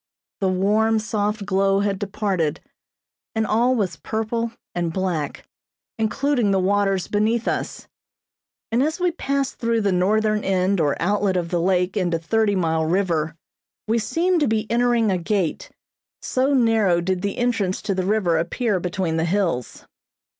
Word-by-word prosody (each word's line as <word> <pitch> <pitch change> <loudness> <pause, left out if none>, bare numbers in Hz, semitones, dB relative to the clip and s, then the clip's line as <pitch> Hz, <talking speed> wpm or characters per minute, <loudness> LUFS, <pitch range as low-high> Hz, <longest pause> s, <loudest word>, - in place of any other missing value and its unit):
The 190 - +1
warm 210 +4 +2
soft 210 -1 -2
glow 195 0 +2
had 200 -1 -1
departed, 190 -6 -1 0.8
and 220 0 +1
all 240 +4 +2
was 195 -7 -1
purple 225 +1 -2 0.2
and 175 -1 -1
black, 170 -5 -3 0.5
including 240 +1 +1
the 195 -1 +2
waters 195 0 +1
beneath 220 +3 0
us; - - -3 0.8
and 235 +3 +2
as 310 +5 0
we 360 -1 +2
passed 275 -5 -2
through 230 -1 +1
the 200 -2 +1
northern 210 +3 +1
end 190 -1 +1
or 145 -2 0
outlet 200 +1 +1
of 170 -2 -2
the 175 -1 0
lake 180 0 +1
into 175 -4 +1
Thirty 205 +5 +1
Mile 160 -3 +1
River 165 -3 0 0.5
we 230 +2 +2
seemed 345 +9 +1
to 295 - +2
be 220 -1 0
entering 235 -2 +2
a 185 - 0
gate, 180 -1 -1 0.5
so 260 +2 0
narrow 225 -8 +3
did 180 +1 -1
the 200 +1 -3
entrance 225 -7 0
to 200 - -1
the 185 -1 -1
river 185 -4 +1
appear 205 +4 -1
between 175 -2 -2
the 160 - +1
hills. 170 - -1
200 Hz, 155 wpm, -22 LUFS, 180-225 Hz, 0.8 s, narrow